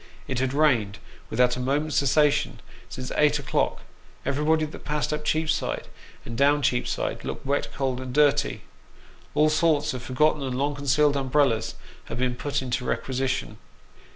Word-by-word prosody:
It 130 Hz, -2 st, -2 dB
had 130 Hz, 0 st, 0 dB
rained, 125 Hz, -9 st, +2 dB, 0.3 s
without 125 Hz, +2 st, +2 dB
a -, -, -5 dB
moment's 145 Hz, +4 st, 0 dB
cessation, 145 Hz, +1 st, +2 dB, 0.3 s
since 130 Hz, 0 st, -6 dB
eight 150 Hz, 0 st, +4 dB
o'clock; 145 Hz, -, -1 dB, 0.4 s
everybody 150 Hz, +3 st, +2 dB
that 150 Hz, -, -10 dB
passed 150 Hz, 0 st, -1 dB
up 150 Hz, 0 st, -3 dB
Cheapside, 155 Hz, +1 st, -1 dB, 0.4 s
and 115 Hz, -, -6 dB
down 145 Hz, +3 st, +3 dB
Cheapside, 125 Hz, -2 st, -1 dB
looked -, -, -6 dB
wet, 140 Hz, +1 st, 0 dB
cold, 130 Hz, -2 st, -1 dB
and 130 Hz, -1 st, -6 dB
dirty. 145 Hz, +1 st, +2 dB, 0.7 s
All 155 Hz, +1 st, +4 dB
sorts 155 Hz, -2 st, +2 dB
of 130 Hz, -, -5 dB
forgotten 150 Hz, +4 st, +1 dB
and 130 Hz, -2 st, -3 dB
long 145 Hz, +2 st, 0 dB
concealed 145 Hz, +1 st, +2 dB
umbrellas 135 Hz, -4 st, +1 dB, 0.3 s
had 115 Hz, -, -6 dB
been 125 Hz, 0 st, 0 dB
put 145 Hz, +1 st, -2 dB
into 125 Hz, 0 st, -2 dB
requisition. 130 Hz, -2 st, -2 dB
140 Hz, 155 wpm, -25 LUFS, 130-150 Hz, 0.7 s, eight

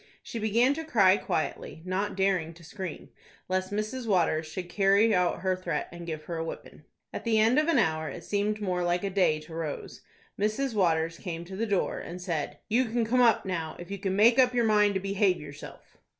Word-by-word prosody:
She 230 Hz, -, -6 dB
began 230 Hz, +5 st, +3 dB
to 320 Hz, +2 st, -5 dB
cry 200 Hz, -11 st, +4 dB
quietly, 160 Hz, -1 st, -3 dB
not 190 Hz, +3 st, -2 dB
daring 185 Hz, -4 st, 0 dB
to 170 Hz, -, -16 dB
scream, 185 Hz, 0 st, -7 dB, 0.4 s
lest 185 Hz, +1 st, -1 dB
Mrs. 215 Hz, +4 st, -3 dB
Waters 170 Hz, -5 st, +2 dB
should 180 Hz, +3 st, -6 dB
carry 200 Hz, +4 st, +3 dB
out 180 Hz, -2 st, +1 dB
her 185 Hz, -1 st, +1 dB
threat 185 Hz, -, -3 dB
and 175 Hz, 0 st, -9 dB
give 155 Hz, -2 st, -5 dB
her 170 Hz, +1 st, -5 dB
a 160 Hz, -, -2 dB
whipping. 165 Hz, -, -8 dB, 0.3 s
At -, -, -5 dB
the 230 Hz, -2 st, +2 dB
end 230 Hz, +6 st, +4 dB
of 305 Hz, -, +1 dB
an 335 Hz, -, +3 dB
hour—it 160 Hz, -, 0 dB
seemed 210 Hz, +3 st, -1 dB
more 180 Hz, -3 st, -1 dB
like 175 Hz, +1 st, 0 dB
a 200 Hz, -, -2 dB
day 185 Hz, -5 st, +2 dB
to 155 Hz, +1 st, -12 dB
Rose—Mrs. 215 Hz, -, -4 dB
Waters 165 Hz, -4 st, +1 dB
came 170 Hz, -2 st, -5 dB
to 190 Hz, +2 st, -8 dB
the 225 Hz, +4 st, -2 dB
door, 200 Hz, -3 st, 0 dB
and 175 Hz, +1 st, -7 dB
said, 170 Hz, -5 st, -3 dB
"You 240 Hz, +4 st, +2 dB
can 230 Hz, 0 st, 0 dB
come 250 Hz, +3 st, +2 dB
up 230 Hz, -4 st, +4 dB
now, 165 Hz, -4 st, -3 dB
if 175 Hz, +2 st, -10 dB
you 200 Hz, -, -4 dB
can 190 Hz, -1 st, -1 dB
make 230 Hz, +5 st, +5 dB
up 250 Hz, -1 st, +4 dB
your 240 Hz, -1 st, +3 dB
mind 210 Hz, -2 st, +3 dB
to -, -, +1 dB
behave 195 Hz, -1 st, +1 dB
yourself." 145 Hz, -1 st, -11 dB
195 Hz, 210 wpm, -28 LUFS, 170-220 Hz, 0.4 s, make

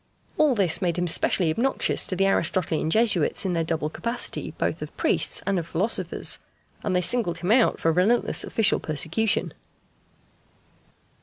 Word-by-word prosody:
All 300 Hz, -4 st, +3 dB
this 190 Hz, -5 st, +2 dB
made 175 Hz, -2 st, -1 dB
him 175 Hz, 0 st, -1 dB
specially 165 Hz, 0 st, +3 dB
obnoxious 245 Hz, +11 st, -1 dB
to 185 Hz, -, -3 dB
the 195 Hz, +2 st, +1 dB
Aristotelian 170 Hz, -3 st, 0 dB
Jesuits 205 Hz, -4 st, +1 dB
in 185 Hz, -, -1 dB
their 165 Hz, -1 st, 0 dB
double 160 Hz, -2 st, -2 dB
capacity 235 Hz, +9 st, -3 dB
both -, -, -2 dB
of -, -, -9 dB
priests -, -, +1 dB
and 195 Hz, -2 st, 0 dB
of 165 Hz, -, -7 dB
philosophers, 185 Hz, 0 st, +1 dB, 0.4 s
and 190 Hz, -3 st, -2 dB
they 180 Hz, -, +2 dB
singled 185 Hz, -1 st, +1 dB
him 175 Hz, +4 st, -2 dB
out 240 Hz, 0 st, +3 dB
for 165 Hz, -, +1 dB
relentless 195 Hz, +8 st, +1 dB
official 220 Hz, -3 st, +1 dB
persecution. 170 Hz, +8 st, -1 dB
185 Hz, 155 wpm, -24 LUFS, 165-220 Hz, 0.4 s, All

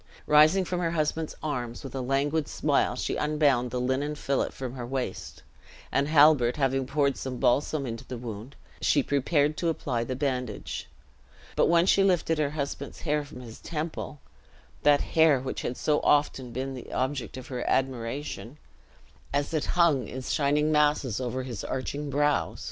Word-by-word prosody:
Rising 155 Hz, +6 st, +5 dB
from 180 Hz, 0 st, -2 dB
her 170 Hz, -2 st, 0 dB
husband's 155 Hz, +1 st, -1 dB
arms, 125 Hz, -6 st, -3 dB
with 135 Hz, -, -8 dB
a 135 Hz, -, -3 dB
languid 140 Hz, +4 st, 0 dB
smile -, -, +1 dB
she -, -, -2 dB
unbound 145 Hz, -5 st, +2 dB
the 125 Hz, -, -2 dB
linen 130 Hz, +4 st, -1 dB
fillet 140 Hz, -2 st, 0 dB
from 130 Hz, -2 st, -6 dB
her 125 Hz, -2 st, -6 dB
waist; 130 Hz, +1 st, -4 dB, 0.5 s
and 140 Hz, +1 st, +1 dB
Halbert 145 Hz, -5 st, +5 dB
having 135 Hz, -2 st, +1 dB
poured 140 Hz, 0 st, +1 dB
some 130 Hz, -1 st, -4 dB
balsam 140 Hz, +4 st, +1 dB
into 115 Hz, -2 st, -5 dB
the 125 Hz, -, -6 dB
wound, 115 Hz, +2 st, -7 dB, 0.3 s
she 145 Hz, -, +3 dB
prepared 145 Hz, +2 st, +1 dB
to 170 Hz, -, 0 dB
apply 125 Hz, -7 st, -1 dB
the 130 Hz, +2 st, -3 dB
bandage; 125 Hz, -5 st, -3 dB, 0.7 s
but -, -, +4 dB
when 170 Hz, 0 st, +5 dB
she 195 Hz, +1 st, +4 dB
lifted 175 Hz, -4 st, +2 dB
her 150 Hz, -2 st, +1 dB
husband's 140 Hz, -1 st, -5 dB
hair 150 Hz, -2 st, 0 dB
from 140 Hz, -3 st, -11 dB
his 115 Hz, -3 st, -10 dB
temple 155 Hz, -2 st, -5 dB, 0.6 s
that 145 Hz, -1 st, +5 dB
hair 160 Hz, -4 st, +4 dB
which 130 Hz, +1 st, -4 dB
had 120 Hz, -, -3 dB
so 150 Hz, -1 st, +2 dB
often 140 Hz, -4 st, +2 dB
been 130 Hz, +2 st, -3 dB
the 125 Hz, -, -9 dB
object 130 Hz, -1 st, -2 dB
of 130 Hz, -, -9 dB
her 125 Hz, -2 st, -3 dB
admiration, 130 Hz, +1 st, -2 dB, 0.7 s
as 145 Hz, +3 st, -1 dB
it 155 Hz, -, 0 dB
hung 160 Hz, -7 st, +4 dB
in 130 Hz, 0 st, -6 dB
shining 150 Hz, +3 st, +1 dB
masses 150 Hz, -6 st, +2 dB
over 130 Hz, +1 st, -2 dB
his 125 Hz, -4 st, -6 dB
arching 140 Hz, +3 st, -3 dB
brows! 145 Hz, +1 st, +1 dB
140 Hz, 170 wpm, -27 LUFS, 130-150 Hz, 0.7 s, Rising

